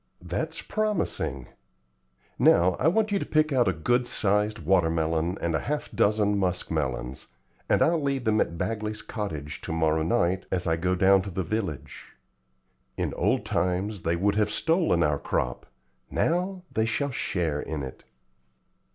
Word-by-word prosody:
"That's - - -3
promising. 210 - -1 0.9
Now 90 +1 +5
I 140 - +2
want 215 +5 +2
you 200 - +2
to - - -2
pick 155 -1 +1
out 125 -4 +3
a - - +4
good 120 +10 +1
sized 105 0 +1
water 85 0 +2
melon 80 +2 0
and 85 - -1
half 150 - -3
a - - -9
dozen 105 -1 +2
musk 90 -2 -1
melons, 65 -5 -3 0.4
and - - +4
I'll 165 0 +2
leave 140 -2 -1
them 110 -1 +2
at 85 - -2
Bagley's 105 +1 -3
cottage 80 - -5
to - - -5
morrow 80 -1 +1
night 90 +1 +1
as 90 -2 -1
I 80 -1 +2
go 90 +3 0
down 95 +1 +5
to 100 - -6
the 95 0 -2
village. 95 -8 -4 0.8
In - - -1
old - - +1
times 95 +2 -1
they 85 +1 0
would 100 +4 +1
have 105 -1 +2
stolen 160 - +2
our 75 -1 +1
crop; 60 0 -2 0.4
now 180 +2 0
they 110 - +2
shall 125 +6 -1
share 80 - -1
in 75 -3 -4
it." 65 - -8
95 Hz, 165 wpm, -27 LUFS, 80-115 Hz, 0.9 s, Now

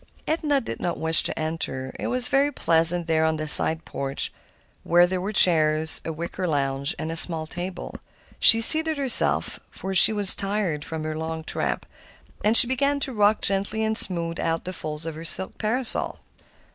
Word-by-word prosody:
Edna 305 -3 -2
did 230 - -9
not 175 - -5
wish 160 0 +3
to - - -5
enter. 155 -5 -6
It - - -6
was 250 0 -3
very 285 0 -1
pleasant 170 - +5
there 160 -1 -2
on 160 0 -2
the 155 0 -7
side 160 +2 +4
porch, 135 0 -6 0.5
where 175 +1 +1
there 180 0 -6
were 200 +3 -6
chairs, 160 -5 +2
a 165 - -7
wicker 170 +3 -7
lounge, 140 -2 -3
and 160 +2 -7
a - - -7
small 165 -1 +4
table. 180 +3 -9 0.5
She 225 -1 +4
seated 315 +5 +5
herself, 270 -3 +3
for 190 - -9
she 190 - +7
was 205 -3 +6
tired 195 -7 -4
from 160 0 -8
her 155 0 -7
long 160 0 -8
tramp; - - -5 0.6
and 220 +2 +3
she - - +8
began 280 +3 -3
to 270 - -5
rock 210 0 -1
gently 200 +3 -3
and 220 0 -3
smooth 170 -5 +2
out 165 0 -5
the 185 - -8
folds 155 -2 -8
of 165 - -7
her 160 +2 -12
silk 175 +3 -1
parasol. 235 +3 -3
175 Hz, 185 wpm, -21 LUFS, 160-220 Hz, 0.6 s, she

